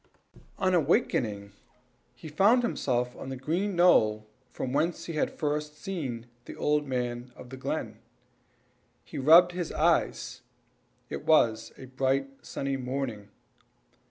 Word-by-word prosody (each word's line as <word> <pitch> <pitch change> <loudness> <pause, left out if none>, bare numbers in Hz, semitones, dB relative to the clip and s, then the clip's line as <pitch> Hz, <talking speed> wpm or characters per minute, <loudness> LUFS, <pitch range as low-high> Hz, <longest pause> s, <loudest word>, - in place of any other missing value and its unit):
On 180 -6 +2
waking, 105 - 0 0.6
he - - -10
found 205 +11 +4
himself 125 - -1
on 135 - -8
the 135 - -4
green 175 +9 -2
knoll 110 -12 +4 0.3
whence 150 +7 -1
he 165 - -5
had 155 - 0
first 150 0 -2
seen 140 - -5 0.2
the - - -9
old 150 0 0
man 125 -1 -3
of 125 - -12
the - - -6
glen. 130 - -4 1.1
He - - -7
rubbed 165 +6 +7
his 175 -2 -4
eyes - - 0 0.7
it - - -5
was 115 -8 +3
a 130 - -10
bright, 135 +1 0
sunny 135 0 -3
morning. 125 -5 -4
135 Hz, 130 wpm, -28 LUFS, 125-165 Hz, 1.1 s, rubbed